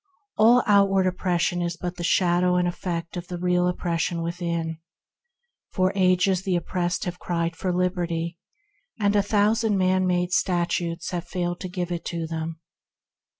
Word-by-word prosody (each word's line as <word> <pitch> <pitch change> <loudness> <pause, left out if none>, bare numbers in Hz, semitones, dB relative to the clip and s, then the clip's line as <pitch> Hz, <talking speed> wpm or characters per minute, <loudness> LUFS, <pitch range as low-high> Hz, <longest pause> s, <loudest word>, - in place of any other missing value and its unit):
All 235 +3 +5
outward 200 -2 +4
oppression 175 -1 0
is 170 0 -2
only 175 -1 -3
the 175 - -6
shadow 180 +1 +3
and 180 0 +2
effect 175 -1 -4
of 175 0 -6
the 180 - -5
real 180 0 +1
oppression 170 -1 -1
within. 170 -1 -3 0.9
For 185 0 +2
ages 185 0 +3
the 190 -1 0
oppressed 175 0 -1
have 180 0 -5
cried 170 -1 -2
for 180 +3 -2
liberty, 175 -2 -1 0.6
and 205 -1 +2
a 205 - +5
thousand 210 +1 +2
man 185 0 +2
made 180 0 0
statutes 170 -2 0
have 175 -1 -4
failed 175 -1 -2
to 185 - -5
give 180 -1 -4
it 170 -1 -3
to 170 -1 -3
them. 160 0 -5
180 Hz, 155 wpm, -25 LUFS, 170-185 Hz, 0.9 s, All